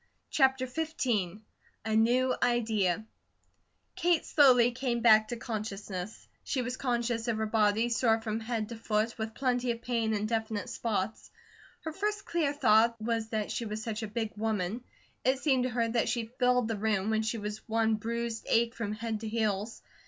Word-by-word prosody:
CHAPTER 265 -2 +3
XV 245 - -2 0.4
A 220 0 0
NEW 250 +3 +3
IDEA 220 -5 +1 0.9
KATE 345 -1 +2
slowly 250 -5 +5
came 240 -1 -2
back 215 -2 +6
to 240 - -4
consciousness. 210 -3 -5 0.2
She 260 -3 -1
was 250 +1 -3
conscious 240 -2 -1
of 230 -2 0
her 220 - 0
body, 215 +1 +2
sore 225 -1 +2
from 220 -1 -3
head 220 -1 -3
to 235 - -6
foot, 220 +1 0
with 220 0 -4
plenty 250 -2 0
of 235 0 -2
pain 230 -3 0
in 210 0 -1
definite 220 -1 -2
spots. 215 -2 -3 0.5
Her 320 - -5
first 415 +3 -2
clear 325 -4 0
thought 230 -4 +4
was 225 0 -1
that 215 -2 -2
she 235 - -2
was 215 0 -4
such 225 -2 -3
a 220 - -3
big 220 0 -3
woman; 215 +1 -2 0.4
it 260 +1 +3
seemed 265 -3 +2
to - - 0
her 235 -1 0
that 230 0 +1
she 235 -2 -1
filled 250 -2 +3
the 225 -2 -2
room, 210 -1 0
when 220 0 +2
she 220 +1 -2
was 210 0 -5
one 225 0 +2
bruised 230 +1 -3
ache 230 +1 +3
from 225 -4 -3
head 220 0 -3
to 220 - -5
heels. 215 -1 -2
225 Hz, 180 wpm, -30 LUFS, 215-245 Hz, 0.9 s, back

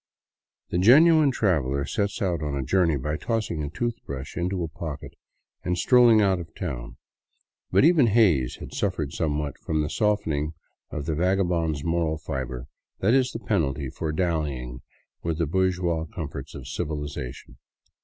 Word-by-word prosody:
The 90 - +1
genuine 150 - +7
traveler 70 - +1
sets 100 +4 -2
out 85 -5 0
on 75 -2 -2
a 70 - -2
journey 85 +2 +2
by 75 +3 -2
tossing 110 -8 -2
a 75 - -3
toothbrush 80 - -4
into 90 0 -1
a - - -2
pocket 75 -2 -7 0.5
and 90 0 -1
strolling 120 +1 +6
out 95 -3 +2
of 80 -2 -9
town. 60 -9 -5 0.7
But - - +4
even 160 -7 +5
Hays 95 - +3
had - - -10
suffered 95 - -2
somewhat 75 -2 -2
from 80 -1 -1
that 75 - -3
softening 80 -8 0 0.3
of 75 - -5
the 80 - -1
vagabond's 85 -3 +1
moral 80 -1 0
fiber 65 -4 -5 0.3
that 110 +5 +2
is 130 -1 +3
the - - -4
penalty 75 - 0
for 80 - -3
dallying 75 -8 -2 0.4
with 80 -2 -2
the 85 - +1
bourgeois 90 -1 0
comforts 80 -2 -7
of - - -8
civilization. 75 -6 -5
80 Hz, 155 wpm, -25 LUFS, 75-95 Hz, 0.7 s, genuine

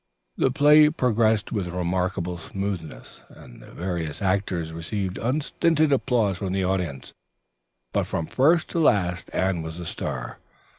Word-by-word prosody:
The - - +2
play 150 +3 +6
progressed 110 -7 +1
with 100 -5 -2
remarkable 90 0 -2
smoothness, 90 -11 -6
and - - -14
the - - -14
various 85 -4 -4
actors 95 -4 -1
received 90 +3 -3
unstinted 155 +4 +1
applause 115 -8 +1
from 95 -2 -3
the 95 0 0
audience, 90 -8 -3 0.8
but - - 0
from 80 - -2
first 155 - +3
to 170 - -1
last 95 - +2
Anne 95 -2 0
was 80 +1 -7
the 90 - -6
star. 65 -6 -5
95 Hz, 140 wpm, -25 LUFS, 85-120 Hz, 0.8 s, play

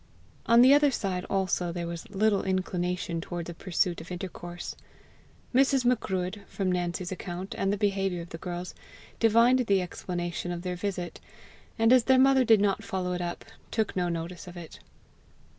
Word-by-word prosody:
On 235 +1 +7
the 260 +2 +8
other 290 0 +5
side 190 -7 -2
also 185 -2 0
there 170 0 -4
was 170 -1 -6
little 205 0 +2
inclination 180 -2 -2
towards 175 0 -5
a - - -8
pursuit 175 -1 -1
of 165 - -11
intercourse. 175 -1 -6 0.8
Mrs. 265 0 +3
Macruadh, 200 -5 0
from 190 -2 -1
Nancy's 175 0 -2
account 180 0 -5
and 195 - 0
the 205 - 0
behaviour 195 -3 0
of 170 - -13
the 165 - -8
girls, 175 0 -5 0.5
divined 230 +3 +5
the 195 -1 +4
explanation 175 -1 -4
of 175 0 -5
their 180 -1 -2
visit; 180 -2 -4 0.6
and, 225 +1 +5
as 250 -3 +5
their 265 -1 +5
mother 265 0 +5
did 225 -3 +5
not 200 -2 +1
follow 185 -3 -2
it 180 - -3
up, 175 0 -4 0.2
took 220 -2 -1
no 180 -1 0
notice 170 +1 -5
of 175 0 -9
it. 170 -2 -10
185 Hz, 175 wpm, -28 LUFS, 175-210 Hz, 0.8 s, the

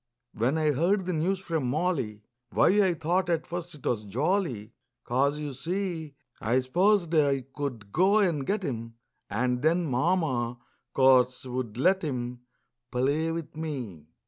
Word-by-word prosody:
When 125 +8 +1
I 155 -1 +2
heard 180 +7 +1
the 180 - -1
news 175 +5 +1
from 165 -7 -2
Molly, 135 - -1 0.3
Why, - - +4
I 185 -3 +2
thought 175 +3 0
at 165 -2 0
first 175 0 -5
't - - -6
was 110 -3 0
jolly, 125 - -1 0.3
'Cause, 140 +4 +1
you 150 -2 -4
see, 165 +1 -3 0.2
I 120 +4 +2
s'posed 175 +6 +2
I 140 -4 +3
could 120 -8 -5
go 190 - +4
and 170 -9 +2
get 200 +7 -1
him 115 -6 -4 0.3
And 125 +4 0
then 170 +3 +2
Mama, 130 -4 0 0.4
course, 130 -1 +4
would 125 -3 -4
let 185 +8 +3
him 125 -5 -3 0.5
Play 140 +6 +1
with 165 -2 -5
me. 125 - -5
145 Hz, 150 wpm, -28 LUFS, 125-175 Hz, 0.5 s, Why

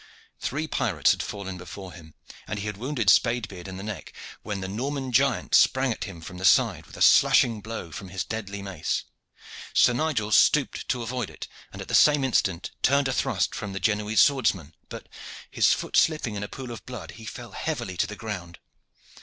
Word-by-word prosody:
Three 155 +4 -3
pirates 105 - +2
had - - -1
fallen 95 -2 -6
before 95 0 -9
him, 80 -3 -14 0.3
and 110 - -4
he 100 - -4
had 105 -1 -3
wounded 120 0 -3
Spade 115 +1 +4
beard 95 -3 -10
in 95 0 -7
the 95 - -7
neck, 105 -2 -7 0.3
when 105 -2 -4
the 95 - -4
Norman 130 +6 -3
giant 130 +1 +1
sprang 130 -1 +4
at - - -4
him 85 -5 -9
from 90 +2 -9
the - - -7
side 95 - +3
with - - -13
a - - +2
slashing 115 -3 +5
blow 110 -6 -6
from 95 +4 -8
his 95 0 -3
deadly 100 -3 -5
mace. 95 -5 -2 0.7
Sir 120 - +5
Nigel 125 -6 -1
stooped 145 +5 +3
to 125 -2 -1
avoid 120 -1 -3
it, - - -9 0.2
and - - -7
at - - -15
the - - -6
same 150 -2 +5
instant 100 -8 0
turned 140 +1 +3
a - - 0
thrust - - 0
from 100 -1 -5
the 95 - -3
Genoese 105 0 +2
swordsman, 105 - +1 0.2
but, - - -9 0.4
his - - +4
foot - - -2
slipping 155 -8 +2
in 100 - -4
a 105 - -4
pool 130 +1 -8
of 110 -6 -8
blood, 115 -10 -7
he 110 0 -12
fell 120 +1 -8
heavily 120 - -4
to 105 - +1
the 105 - -7
ground. 90 -6 -6
105 Hz, 205 wpm, -26 LUFS, 95-125 Hz, 0.7 s, slashing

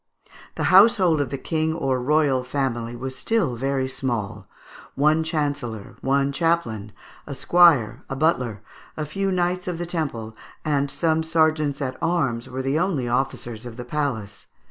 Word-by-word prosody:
The - - -2
household 190 -6 +6
of 140 - -2
the 140 - -3
King 160 +3 -1
or 135 -5 0
royal 140 -1 +2
family 125 -3 -2
was 130 +2 -5
still 185 - 0
very 135 +2 -1
small: 120 -6 -3 0.5
one 155 +3 +3
chancellor, 145 -9 -3
one 140 +1 +1
chaplain, 140 - -1 0.4
a 140 - -5
squire, 140 -8 +4
a 135 - -3
butler, 125 -8 0 0.3
a 155 - -2
few 195 +6 -2
Knights 180 0 0
of 180 -2 -2
the 175 - -3
Temple, 135 -11 -3 0.3
and 145 -2 +1
some 160 +2 +1
sergeants 155 -3 +1
at 130 -1 -4
arms 150 -9 0
were 130 +1 -4
the 135 +4 +1
only 170 -9 0
officers 120 -2 -2
of 120 -1 -9
the 125 - -6
palace. 120 -8 -3
140 Hz, 155 wpm, -23 LUFS, 125-160 Hz, 0.5 s, household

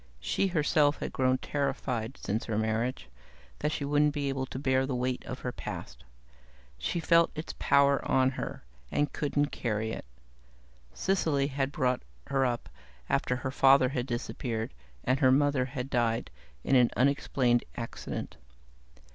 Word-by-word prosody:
She 195 - 0
herself 150 -4 +3
had - - -5
grown 130 0 +2
terrified, 130 -4 -2
since 110 +3 -2
her 110 -2 -2
marriage, 110 - -1 0.5
that 150 - 0
she 145 - -2
wouldn't 145 +1 +2
be 140 -1 -1
able 135 -1 -2
to - - -6
bear 130 -1 +1
the 130 - -1
weight 125 0 -1
of 130 - -6
her 125 - -2
past. - - -7 0.8
She 170 - -1
felt 170 0 +4
its 155 +1 -5
power 140 0 +4
on 130 0 +4
her 130 - -5 0.3
and 145 -1 0
couldn't 145 0 0
carry 110 -1 -2
it. - - -6 0.9
Cecily 160 - +1
had 135 0 -1
brought 125 -4 +1 0.2
her 135 -1 +2
up, 120 -1 -3 0.4
after 125 - +1
her 130 +1 -3
father 135 -1 +5
had 125 -2 -2
disappeared 120 - -3 0.3
and 130 +2 +1
her 130 -1 +5
mother 140 -1 +3
had 125 0 -5
died 120 -3 0 0.3
in 135 - +2
an 125 -2 +6
unexplained 130 -2 +2
accident. 115 -1 -5
130 Hz, 155 wpm, -29 LUFS, 125-145 Hz, 0.9 s, an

